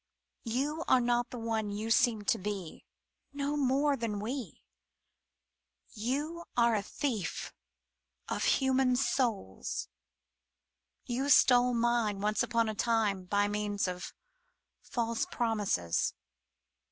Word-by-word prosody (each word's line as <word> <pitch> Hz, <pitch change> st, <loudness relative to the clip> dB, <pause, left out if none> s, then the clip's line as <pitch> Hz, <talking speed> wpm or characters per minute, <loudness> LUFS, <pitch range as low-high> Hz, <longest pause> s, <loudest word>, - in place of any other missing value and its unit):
You 290 Hz, +7 st, -1 dB
are 255 Hz, -, +5 dB
not 240 Hz, 0 st, +1 dB
the 250 Hz, -, -7 dB
one 225 Hz, -2 st, -2 dB
you 215 Hz, +2 st, -3 dB
seem 225 Hz, -3 st, +3 dB
to -, -, +1 dB
be 195 Hz, -4 st, -5 dB, 0.2 s
— -, -, -50 dB
no 285 Hz, +1 st, -2 dB
more 280 Hz, +1 st, +2 dB
than 230 Hz, -5 st, -3 dB
we! 240 Hz, +2 st, -5 dB, 1.3 s
You 290 Hz, +10 st, -3 dB
are 235 Hz, -1 st, +4 dB
a 210 Hz, -, +1 dB
thief 215 Hz, -, -3 dB, 0.7 s
of -, -, -2 dB
human 265 Hz, -1 st, +3 dB
souls! 235 Hz, -, -1 dB, 1.2 s
You 260 Hz, +3 st, -1 dB
stole 250 Hz, -2 st, +6 dB
mine 230 Hz, -3 st, +1 dB
once 210 Hz, +1 st, +1 dB
upon 230 Hz, -2 st, +1 dB
a 220 Hz, -, -1 dB
time 215 Hz, -4 st, +1 dB
by 205 Hz, +2 st, +2 dB
means 205 Hz, -1 st, -1 dB
of 180 Hz, 0 st, -5 dB, 0.7 s
false 230 Hz, -1 st, -2 dB
promises. 205 Hz, -, 0 dB
230 Hz, 115 wpm, -31 LUFS, 210-255 Hz, 1.3 s, stole